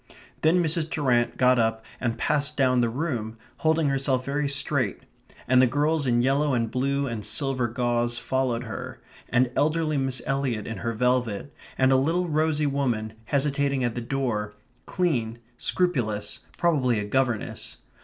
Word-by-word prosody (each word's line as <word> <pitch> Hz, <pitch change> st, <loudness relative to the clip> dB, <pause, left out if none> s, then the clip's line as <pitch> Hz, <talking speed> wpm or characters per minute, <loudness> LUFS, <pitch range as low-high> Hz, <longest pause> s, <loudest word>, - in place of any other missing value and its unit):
Then 170 Hz, +3 st, +4 dB
Mrs. 160 Hz, 0 st, 0 dB
Durrant 125 Hz, -7 st, +1 dB
got 125 Hz, -1 st, +4 dB
up 110 Hz, 0 st, 0 dB
and 120 Hz, -2 st, -1 dB
passed 150 Hz, 0 st, 0 dB
down 130 Hz, -2 st, +3 dB
the 120 Hz, -, +2 dB
room, 115 Hz, -5 st, -3 dB, 0.2 s
holding 160 Hz, -1 st, +2 dB
herself 135 Hz, -2 st, 0 dB
very 140 Hz, +1 st, -1 dB
straight, 140 Hz, -5 st, 0 dB, 0.4 s
and 130 Hz, 0 st, +5 dB
the 130 Hz, -, +5 dB
girls 145 Hz, +2 st, +1 dB
in 120 Hz, -1 st, +3 dB
yellow 140 Hz, +1 st, +2 dB
and 115 Hz, -2 st, -1 dB
blue 140 Hz, +3 st, 0 dB
and 115 Hz, -5 st, -4 dB
silver 125 Hz, +4 st, 0 dB
gauze 120 Hz, 0 st, 0 dB
followed 130 Hz, -2 st, -1 dB
her, 125 Hz, +2 st, -7 dB, 0.3 s
and 125 Hz, 0 st, +2 dB
elderly 155 Hz, 0 st, +1 dB
Miss 135 Hz, -2 st, -1 dB
Eliot 135 Hz, -6 st, -1 dB
in 110 Hz, -, -5 dB
her 115 Hz, +4 st, -2 dB
velvet; 125 Hz, +1 st, 0 dB, 0.2 s
and 130 Hz, 0 st, +4 dB
a 135 Hz, -, +5 dB
little 165 Hz, +7 st, +1 dB
rosy 155 Hz, -1 st, +1 dB
woman, 125 Hz, -6 st, -1 dB
hesitating 140 Hz, -1 st, 0 dB
at 120 Hz, -2 st, 0 dB
the 120 Hz, -, -4 dB
door, 115 Hz, -5 st, -2 dB, 0.3 s
clean, 125 Hz, -11 st, 0 dB, 0.2 s
scrupulous, 115 Hz, -, 0 dB, 0.2 s
probably 140 Hz, -9 st, +2 dB
a 105 Hz, -, -2 dB
governess. 125 Hz, 0 st, -1 dB
130 Hz, 155 wpm, -26 LUFS, 120-145 Hz, 0.4 s, and